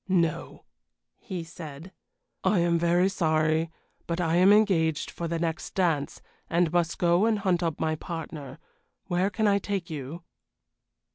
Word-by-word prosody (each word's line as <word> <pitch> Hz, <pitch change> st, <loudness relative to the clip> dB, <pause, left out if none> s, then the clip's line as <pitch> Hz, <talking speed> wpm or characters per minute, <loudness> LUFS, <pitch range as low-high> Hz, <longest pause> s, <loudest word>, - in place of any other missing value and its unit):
"No," 170 Hz, -4 st, 0 dB, 0.6 s
he 180 Hz, -3 st, -5 dB
said. 165 Hz, 0 st, -10 dB, 0.5 s
"I 210 Hz, -, +3 dB
am 170 Hz, -1 st, +2 dB
very 175 Hz, +2 st, +3 dB
sorry, 160 Hz, -3 st, +1 dB, 0.4 s
but 170 Hz, +1 st, -2 dB
I 165 Hz, -1 st, +1 dB
am 185 Hz, +3 st, +6 dB
engaged 170 Hz, -8 st, +3 dB
for 170 Hz, -, -4 dB
the 165 Hz, 0 st, -2 dB
next 165 Hz, 0 st, -3 dB
dance, 165 Hz, -7 st, 0 dB, 0.3 s
and 170 Hz, -1 st, +2 dB
must 170 Hz, -1 st, +1 dB
go 175 Hz, +4 st, +3 dB
and 225 Hz, -2 st, +2 dB
hunt 185 Hz, -4 st, +1 dB
up 165 Hz, -3 st, -1 dB
my 160 Hz, 0 st, 0 dB
partner. 155 Hz, -4 st, -6 dB, 0.5 s
Where 185 Hz, +1 st, +1 dB
can 220 Hz, +1 st, 0 dB
I 200 Hz, 0 st, +3 dB
take 195 Hz, -4 st, -3 dB
you?" 155 Hz, +3 st, -6 dB
170 Hz, 150 wpm, -27 LUFS, 160-185 Hz, 0.6 s, am